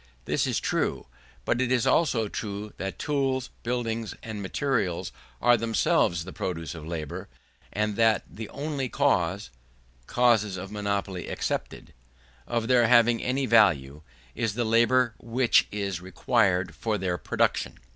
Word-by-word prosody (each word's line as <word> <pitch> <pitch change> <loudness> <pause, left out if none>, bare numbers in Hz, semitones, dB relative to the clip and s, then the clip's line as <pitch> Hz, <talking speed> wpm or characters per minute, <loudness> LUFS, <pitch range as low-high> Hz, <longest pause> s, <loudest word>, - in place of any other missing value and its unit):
This - - 0
is - - 0
true; - - -1 0.4
but 120 - +1
it 130 -1 0
is 125 -3 +2
also 125 -9 +2
true 105 0 -5
that 95 0 -4
tools, 135 -3 -1
buildings, 115 -2 -2
and 110 -2 -6
materials, 105 - -1 0.3
are 120 0 +5
themselves 110 -6 +1
the 95 - -8
produce 80 -5 -4
of 80 -2 -9
labour; 80 -4 -5 0.4
and 105 0 -1
that 115 -2 +3
the 110 0 -8
only 140 -3 -3
cause 95 - +1 0.6
(cases 110 -6 +2
of 95 +2 -7
monopoly 100 -3 -3
excepted) - - -4 0.5
of 115 -1 -1
their 120 -2 +4
having 120 -1 +5
any 130 +2 0
value, 80 - +3 0.3
is 110 +3 -2
the 120 0 0
labour 120 +2 +3
which 120 +1 +2
is 100 -4 -3
required 90 0 +1
for 110 -2 -2
their 90 -3 -2
production. - - 0
110 Hz, 140 wpm, -27 LUFS, 95-120 Hz, 0.6 s, are